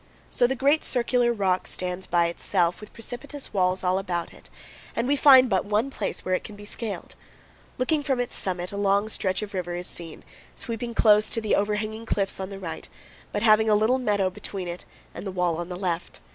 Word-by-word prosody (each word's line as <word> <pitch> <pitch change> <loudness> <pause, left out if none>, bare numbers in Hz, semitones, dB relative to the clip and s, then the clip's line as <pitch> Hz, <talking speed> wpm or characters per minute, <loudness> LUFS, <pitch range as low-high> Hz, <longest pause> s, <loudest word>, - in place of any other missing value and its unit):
So 245 - +4
the 265 - -1
great 280 +4 +3
circular 245 -1 +2
rock 190 -5 0
stands 180 0 -3
by 170 -1 +3
itself, 170 +1 0
with 210 - -11
precipitous 260 +4 -4
walls 185 -1 +1
all 185 +1 +2
about 175 -3 -3
it, - - -17 0.5
and 230 +2 0
we 285 - +3
find 265 -2 +8
but 190 -5 +1
one 215 +6 0
place - - -4
where 185 - 0
it 185 - 0
can 210 - -9
be 205 0 -11
scaled. 210 0 -3 0.6
Looking 295 +4 +1
from 270 -3 0
its 245 - -2
summit, 180 -1 -2
a 200 - -5
long 200 +1 +2
stretch 185 -2 -1
of 205 - -7
river 175 -2 -3
is 175 0 -4
seen, 165 -3 -7 0.3
sweeping 235 0 -4
close 210 -1 +5
to - - 0
the 215 -2 -1
overhanging 215 +2 -1
cliffs 195 -3 0
on 190 0 -4
the 195 - -7
right, 165 - -7 0.4
but 205 - -2
having 220 0 +5
a 210 - +6
little 220 +5 +3
meadow 205 -6 +1
between 195 -1 -6
it 175 +1 -6 0.3
and - - -7
the 195 - -4
wall 180 -3 0
on 175 +1 -5
the 180 - -5
left. 175 -2 -3
205 Hz, 215 wpm, -25 LUFS, 185-230 Hz, 0.6 s, find